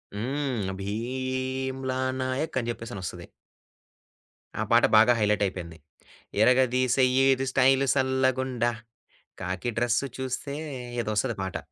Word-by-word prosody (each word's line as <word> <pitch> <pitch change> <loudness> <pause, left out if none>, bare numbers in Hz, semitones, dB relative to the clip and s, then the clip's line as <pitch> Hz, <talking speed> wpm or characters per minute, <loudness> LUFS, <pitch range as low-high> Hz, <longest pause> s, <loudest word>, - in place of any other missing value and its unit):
హ్మ్. 125 -2 -2
భీమ్లా 130 +4 -3 0.2
నాయక్ 130 +5 -2
అని 120 - -3
చెప్పేసనొస్తది. 110 -6 -7 1.4
ఆ - - +2
పాట - - +6
బాగా 115 +3 +6
హైలైటయిపోయింది. 95 -5 0 0.6
ఇరగదిసేయ్యి 130 +2 +3
ఇది 135 +1 -3
స్టైల్ 135 +1 +4
సల్లగుండా 130 -2 +1 0.7
కాకి 95 +6 -3
డ్రెస్ 120 +2 +1 0.2
చూస్తే 130 +2 -3 0.5
ఏదో 110 - -4
వస్తది 105 - 0
పాట. 95 - -3
130 Hz, 95 wpm, -27 LUFS, 110-130 Hz, 1.4 s, పాట